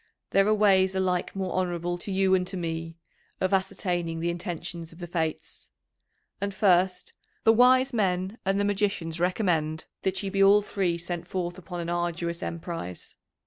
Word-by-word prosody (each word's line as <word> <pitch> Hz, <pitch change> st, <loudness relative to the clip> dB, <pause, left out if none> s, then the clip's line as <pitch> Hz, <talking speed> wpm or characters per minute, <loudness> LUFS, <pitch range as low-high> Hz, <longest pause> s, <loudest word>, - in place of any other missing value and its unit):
There 195 Hz, +1 st, +4 dB
are 215 Hz, -, +4 dB
ways 190 Hz, -2 st, +4 dB
alike 185 Hz, -1 st, 0 dB
more 190 Hz, -1 st, -2 dB
honourable 175 Hz, -1 st, -1 dB
to 200 Hz, -, -6 dB
you 190 Hz, 0 st, +3 dB
and 180 Hz, -1 st, +2 dB
to 190 Hz, +1 st, -4 dB
me 165 Hz, -1 st, -4 dB, 0.4 s
of 185 Hz, +1 st, 0 dB
ascertaining 175 Hz, -3 st, -1 dB
the 170 Hz, +1 st, 0 dB
intentions 170 Hz, -1 st, -5 dB
of 165 Hz, -, -15 dB
the 175 Hz, -, -6 dB
fates. 165 Hz, -2 st, -4 dB, 0.7 s
And 200 Hz, -1 st, -2 dB
first, 185 Hz, -2 st, +2 dB, 0.3 s
the 225 Hz, -, +6 dB
wise 255 Hz, +3 st, +5 dB
men 190 Hz, -1 st, 0 dB
and 195 Hz, +1 st, +1 dB
the 205 Hz, -, +2 dB
magicians 195 Hz, -5 st, -1 dB
recommend 170 Hz, -4 st, 0 dB, 0.2 s
that 190 Hz, +2 st, -1 dB
ye 195 Hz, -, -3 dB
be 195 Hz, 0 st, +1 dB
all 200 Hz, +1 st, +6 dB
three 185 Hz, -4 st, -1 dB
sent 175 Hz, 0 st, -5 dB
forth 175 Hz, 0 st, -3 dB
upon 175 Hz, 0 st, -6 dB
an 170 Hz, -, -4 dB
arduous 175 Hz, 0 st, -2 dB
emprise. 165 Hz, -, -6 dB
180 Hz, 170 wpm, -27 LUFS, 170-195 Hz, 0.7 s, the